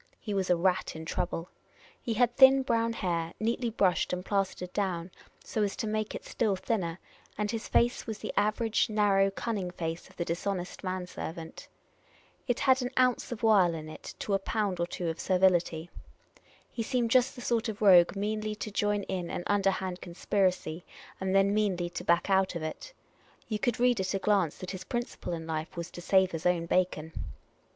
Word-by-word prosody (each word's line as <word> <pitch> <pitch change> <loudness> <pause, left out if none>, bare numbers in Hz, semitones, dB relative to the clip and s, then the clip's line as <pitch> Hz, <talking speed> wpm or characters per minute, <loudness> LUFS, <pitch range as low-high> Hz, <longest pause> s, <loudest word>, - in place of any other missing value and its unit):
He 210 - -4
was 190 -2 0
a 180 - +5
rat 180 0 0
in 160 0 -7
trouble. 165 +1 -2 0.5
He 230 - -2
had 240 +1 +2
thin 265 0 +7
brown 230 -2 +1
hair, 170 -5 -2
neatly 230 +2 0
brushed 195 -5 +1
and 180 +1 -3
plastered 190 -2 -1
down, 185 -3 -2 0.3
so 220 - -2
as 205 -1 0
to - - -3
make 215 0 -2
it - - -7
still 215 -5 0
thinner, 185 -4 -2 0.4
and 210 0 -1
his 225 -1 -4
face 240 +1 +2
was 220 -2 -4
the - - -5
average 215 +3 +1
narrow 200 -2 +3
cunning 195 -2 -3
face 165 -1 -5
of - - -19
the 170 - -2
dishonest 180 +3 -3
man 185 -1 -2
servant. 165 -2 -7 0.8
It 245 - 0
had 260 -1 +4
an 250 - -1
ounce 255 -1 +2
of 235 -2 -6
wile 195 -6 +5
in 155 -1 -7
it - - -9
to 205 - -1
a 195 - +3
pound 200 -2 -1
or 170 - 0
two 175 0 -4
of 165 0 -3
servility. 175 -3 +2 0.8
He 230 - -4
seemed 235 -1 0
just 255 -1 +4
the 245 - -9
sort 235 -2 0
of 210 - -5
rogue 185 -3 +6
meanly 215 +1 -2
to 215 0 -5
join 205 0 0
in 180 -3 -3
an - - -4
underhand 190 -2 0
conspiracy, 180 -2 -1 0.4
and 190 0 -1
then 195 +1 +4
meanly 185 -5 0
to - - -5
back 170 0 +2
out 190 -2 +2
of 165 - -3
it. 155 - -6 0.6
You 215 -2 -2
could 245 -2 0
read 245 -2 +3
at 190 +1 -1
a - - +2
glance 195 -5 +1
that 185 0 -6
his 185 -2 -6
principle 240 -3 -4
in 165 -1 -5
life 160 +1 -4
was 170 0 -5
to 175 - -8
sav^e 190 +1 +3
his 165 +1 -1
own 175 -2 +1
bacon. 165 -3 0
195 Hz, 195 wpm, -29 LUFS, 175-215 Hz, 0.8 s, thin